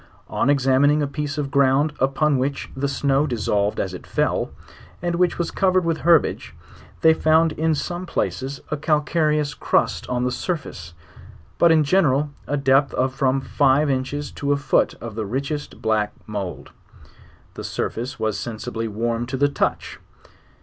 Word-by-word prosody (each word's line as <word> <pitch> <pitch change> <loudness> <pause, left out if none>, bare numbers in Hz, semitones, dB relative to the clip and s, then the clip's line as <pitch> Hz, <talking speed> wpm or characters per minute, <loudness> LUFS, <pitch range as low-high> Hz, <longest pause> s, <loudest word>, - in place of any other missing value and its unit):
On - - 0
examining 140 +2 +3
a - - 0
piece 145 0 -4
of 140 -2 -2
ground 140 +2 +3
upon 135 +2 +2
which 140 +2 -3
the 135 +1 -1
snow 140 +1 +1
dis 120 -6 -3
solved 100 0 +1
as 95 - -2
it 90 - -9
fell, - - 0 0.5
and 175 0 -2
which 175 0 +1
was 170 -1 -2
covered 185 -2 +2
with 165 -1 0
herbage,. 170 -1 +2 0.5
they 160 0 +6
founxi 160 0 +3
in 160 0 +2
some 175 +4 -4
places, 135 -4 -3
a 150 - 0
calcareous 150 -1 +1
crust - - 0
on 125 0 0
the 125 - 0
surface; 125 - -5 0.6
but 170 - +6
in 160 -1 +5
general 150 -3 +2 0.2
a 145 - 0
depth 135 -1 +3
of 130 +1 0
from 135 0 +1
five 140 +1 +2
inches 135 +2 -3
to 145 0 -2
a 145 - +3
foot 140 -2 +1
of 115 -2 -7
the 110 +1 -3
richest 140 +6 -4
black 110 -2 +1
mould. 100 -4 -6 0.8
The - - -8
surface 125 +3 -4
was 110 -2 -1
sensibly 115 +1 -4
warm 115 +2 -2
to 130 +1 -3
the 145 +2 +3
touch. - - -2
140 Hz, 165 wpm, -22 LUFS, 125-150 Hz, 0.8 s, they